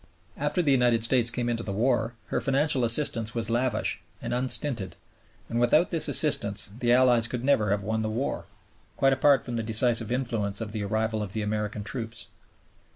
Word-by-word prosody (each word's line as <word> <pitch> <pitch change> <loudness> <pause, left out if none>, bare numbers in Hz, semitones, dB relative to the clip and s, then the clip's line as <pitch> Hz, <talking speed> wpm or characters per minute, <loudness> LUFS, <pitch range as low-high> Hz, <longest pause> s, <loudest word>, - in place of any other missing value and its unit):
After 180 - -1
the 145 - +2
United 120 -3 +2
States 120 0 +2
came 120 +1 -3
into 115 -1 -2
the 105 - -5
war 115 +2 0
her - - -1
financial 135 -1 +1
assistance 115 -2 +1
was 115 -1 -3
lavish 120 -2 -1 0.2
and - - -5
unstinted, 125 -3 -1 0.5
and 115 - -2
without 150 +8 +3
this 165 -3 +4
assistance 105 -10 +4
the 120 -1 +1
Allies 120 -2 +4
could 120 +1 -5
never 130 -6 +2
have 100 0 -1
won 110 +2 -2
the 110 - -2
war, 120 +6 -3 0.5
quite 135 0 +3
apart 140 0 +3
from 120 -2 -4
the - - -1
decisive 115 0 +1
influence 115 -6 -2
of 110 -2 -5
the 105 0 -4
arrival 110 +1 -2
of 100 -2 -6
the 110 - -3
American 105 0 -3
troops. 115 0 -6
115 Hz, 185 wpm, -26 LUFS, 110-130 Hz, 0.5 s, this